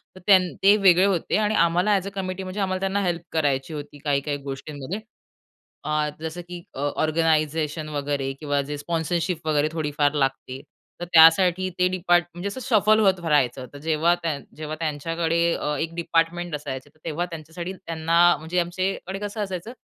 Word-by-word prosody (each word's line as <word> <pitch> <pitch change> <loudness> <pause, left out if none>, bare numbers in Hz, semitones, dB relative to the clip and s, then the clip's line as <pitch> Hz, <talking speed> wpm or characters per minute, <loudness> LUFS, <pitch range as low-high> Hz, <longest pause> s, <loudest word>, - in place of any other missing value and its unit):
तर - - -11
त्यांनी, 185 -3 +5
ते 200 +2 +7
वेगळे 190 -2 +5
होते 195 0 +1
आणि 215 0 +1
आम्हाला 180 +5 +2
एज-अ 195 +1 -4
कमिटी 190 -1 -4
म्हणजे 185 +2 -6
आम्हाला 185 -1 -1
त्यांना 195 +1 0
हेल्प 175 -2 -1
करायची 145 -1 0
होती, 145 0 -7
काही-काही 145 0 -1
गोष्टींमध्ये. 145 +7 -6 0.8
अ, 150 0 0
जसं 160 +2 -5
की 175 -1 -7 0.2
ऑर्गनायझेशन 155 +1 0
वगैरे, 145 -2 -2
किंवा 145 -2 0
जे 145 +1 -5
स्पॉन्सरशिप 165 +2 -2
वगैरे 150 -1 +2
थोडीफार 150 -2 0
लागते 135 -2 -2 0.4
तर 175 - -2
त्यासाठी 175 +3 +6
ते 180 - +4
डिपार्ट 175 -1 +2
म्हणजे 175 +4 -4
जसं 260 - -7
शफल 215 -3 +4
होत 190 -3 +3
राहायचं, 135 -5 +1
तर - - -9
जेव्हा 160 +2 +2
त्या, 155 -4 -1 0.2
जेव्हा 155 0 -5
त्यांच्याकडे 165 +2 -1 0.2
अ, 150 - -2
एक 165 +1 -3
डिपार्टमेंट 170 0 0
असायचं 140 -2 -6
तर 155 +1 -31
तेव्हा 165 +2 -2
त्यांच्यासाठी 170 +2 -7
त्यांना 165 -2 -2 0.2
म्हणजे 160 +4 -2
आमच्याकडे 185 +2 -2
कसं 205 +1 -4
असायचं, 190 +2 -5
165 Hz, 165 wpm, -24 LUFS, 150-185 Hz, 0.8 s, ते